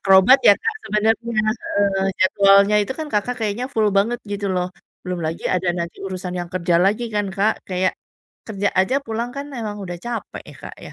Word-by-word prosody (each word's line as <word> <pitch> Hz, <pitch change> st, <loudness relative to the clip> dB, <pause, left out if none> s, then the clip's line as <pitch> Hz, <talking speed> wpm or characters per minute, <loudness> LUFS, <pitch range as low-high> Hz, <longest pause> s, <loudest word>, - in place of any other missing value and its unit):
akrobat 195 Hz, +7 st, +6 dB
ya 205 Hz, -, +9 dB
Kak -, -, -2 dB
sebenarnya, 215 Hz, +1 st, +3 dB, 0.5 s
heeh, 195 Hz, -1 st, 0 dB
jadwalnya 200 Hz, +2 st, +5 dB
itu 205 Hz, -, -3 dB
kan 315 Hz, -, -3 dB
Kakak 225 Hz, +4 st, 0 dB
kayaknya 215 Hz, +4 st, -2 dB
full 220 Hz, -6 st, +2 dB
banget 225 Hz, +5 st, +2 dB
gitu 205 Hz, 0 st, -3 dB
loh. 180 Hz, 0 st, -1 dB, 0.4 s
Belum 180 Hz, -1 st, -3 dB
lagi 165 Hz, +2 st, -5 dB
ada 180 Hz, 0 st, 0 dB
nanti 170 Hz, -1 st, -4 dB
urusan 185 Hz, -1 st, -5 dB
yang 175 Hz, -1 st, -4 dB
kerja 175 Hz, -2 st, +1 dB
lagi 205 Hz, +6 st, +2 dB
kan 205 Hz, -1 st, 0 dB
Kak 200 Hz, +3 st, -1 dB
kayak, 185 Hz, 0 st, 0 dB, 0.5 s
kerja 205 Hz, -2 st, -1 dB
aja 190 Hz, +8 st, +2 dB
pulang 230 Hz, +2 st, -3 dB
kan 280 Hz, +1 st, -4 dB
emang 215 Hz, -4 st, -5 dB
udah 175 Hz, -1 st, -6 dB
capek 235 Hz, +2 st, -6 dB
ya -, -, -12 dB
Kak -, -, -9 dB
ya, -, -, -11 dB
200 Hz, 190 wpm, -21 LUFS, 185-220 Hz, 0.5 s, ya